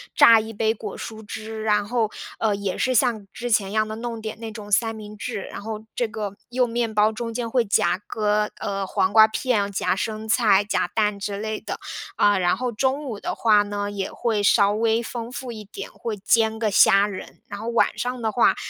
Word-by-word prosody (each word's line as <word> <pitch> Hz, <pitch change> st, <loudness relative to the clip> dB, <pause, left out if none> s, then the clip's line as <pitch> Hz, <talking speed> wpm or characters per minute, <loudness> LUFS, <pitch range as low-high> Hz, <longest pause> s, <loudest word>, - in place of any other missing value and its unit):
榨 230 Hz, -1 st, +8 dB
一 220 Hz, +1 st, -5 dB
杯 220 Hz, +1 st, +1 dB
果 210 Hz, -2 st, -7 dB
蔬 220 Hz, -1 st, -7 dB
汁 220 Hz, +1 st, -6 dB
啊， 210 Hz, -, +5 dB
然 205 Hz, -1 st, 0 dB
后 230 Hz, -1 st, 0 dB, 0.3 s
呃， 215 Hz, -2 st, +1 dB
也 200 Hz, -2 st, -3 dB
是 255 Hz, 0 st, +1 dB
像 220 Hz, -3 st, +1 dB
之 245 Hz, +3 st, -5 dB
前 205 Hz, -3 st, +2 dB
一 -, -, -7 dB
样 215 Hz, 0 st, +2 dB
的 215 Hz, -, -5 dB
弄 230 Hz, 0 st, -5 dB
点 220 Hz, 0 st, -6 dB
那 225 Hz, -1 st, -6 dB
种 210 Hz, -1 st, -9 dB
三 225 Hz, +2 st, +2 dB
明 210 Hz, -1 st, -9 dB
治， 215 Hz, -1 st, -4 dB
然 -, -, -8 dB
后 215 Hz, 0 st, -6 dB
这 240 Hz, -, 0 dB
个 210 Hz, -2 st, -5 dB
用 250 Hz, +1 st, +2 dB
面 230 Hz, -1 st, -1 dB
包 210 Hz, +1 st, +4 dB
中 230 Hz, +1 st, -5 dB
间 235 Hz, 0 st, -3 dB
会 245 Hz, +1 st, +2 dB
夹 200 Hz, -2 st, +1 dB
个 210 Hz, -1 st, 0 dB
呃， 195 Hz, -1 st, -2 dB
黄 190 Hz, 0 st, 0 dB
瓜 220 Hz, -1 st, +8 dB
片， 220 Hz, -3 st, 0 dB
夹 190 Hz, -, 0 dB
生 215 Hz, +2 st, -4 dB
菜， 215 Hz, -3 st, +4 dB
夹 205 Hz, -, -1 dB
蛋 210 Hz, -2 st, +1 dB
之 200 Hz, 0 st, -3 dB
类 215 Hz, 0 st, -3 dB
的。 -, -, -5 dB, 0.4 s
啊， 205 Hz, -1 st, +4 dB
然 175 Hz, -1 st, +2 dB
后 250 Hz, -1 st, -2 dB
中 265 Hz, +6 st, 0 dB
午 225 Hz, -6 st, -5 dB
的 -, -, -3 dB
话 215 Hz, -2 st, +4 dB
呢， 205 Hz, 0 st, -3 dB
也 200 Hz, -1 st, -4 dB
会 225 Hz, -4 st, -1 dB
稍 205 Hz, 0 st, +4 dB
微 225 Hz, +2 st, +1 dB
丰 235 Hz, 0 st, -6 dB
富 255 Hz, 0 st, -6 dB
一 215 Hz, -2 st, -8 dB
点， 200 Hz, -, -8 dB
会 225 Hz, -3 st, -5 dB
煎 220 Hz, +2 st, +2 dB
个 220 Hz, -2 st, 0 dB
虾 200 Hz, 0 st, +6 dB
仁。 200 Hz, -3 st, -8 dB
然 205 Hz, -, -7 dB
后 220 Hz, -, -6 dB
晚 235 Hz, -, +2 dB
上 250 Hz, 0 st, -3 dB
的 220 Hz, -1 st, 0 dB
话， 240 Hz, -, +4 dB
220 Hz, 245 characters per minute, -23 LUFS, 205-230 Hz, 0.4 s, 榨